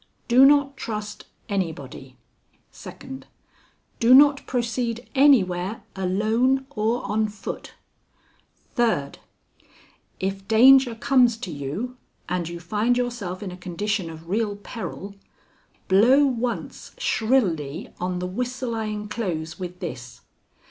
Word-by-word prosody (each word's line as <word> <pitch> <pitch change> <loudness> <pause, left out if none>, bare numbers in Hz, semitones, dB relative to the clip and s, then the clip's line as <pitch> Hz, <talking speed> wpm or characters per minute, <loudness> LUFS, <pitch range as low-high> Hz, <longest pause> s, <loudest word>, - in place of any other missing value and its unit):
Do 255 +2 +7
not 285 -1 +3
trust 210 -3 -5 0.2
anybody. 145 -9 -4 0.5
"Second. 265 0 -10 0.7
Do 240 +2 +7
not 285 0 +5
proceed 235 -1 -2
anywhere 215 -9 +3
alone 220 +8 +1
or 225 0 -1
on 215 +2 0
foot. 205 -1 -7 1.0
"Third. 225 - 0 1.0
If 195 +1 -3
danger 250 +2 +6
comes 245 -1 +3
to 210 -7 -6
you, 155 - -5 0.3
and 175 -2 -2
you 170 0 -7
find 215 +7 0
yourself 230 -7 -3
in 190 - -5
a - - -8
condition 185 +1 -3
of 160 0 -11
real 205 +2 -1
peril, 205 -1 -7 0.7
blow 245 +9 +5
once 245 -2 -3
shrilly 185 - 0
on 180 0 -2
the 180 - -3
whistle 250 +5 -3
I 225 -1 -2
inclose 205 -6 -4
with 180 -1 -7
this. 125 -8 -7
215 Hz, 115 wpm, -24 LUFS, 180-245 Hz, 1.0 s, Do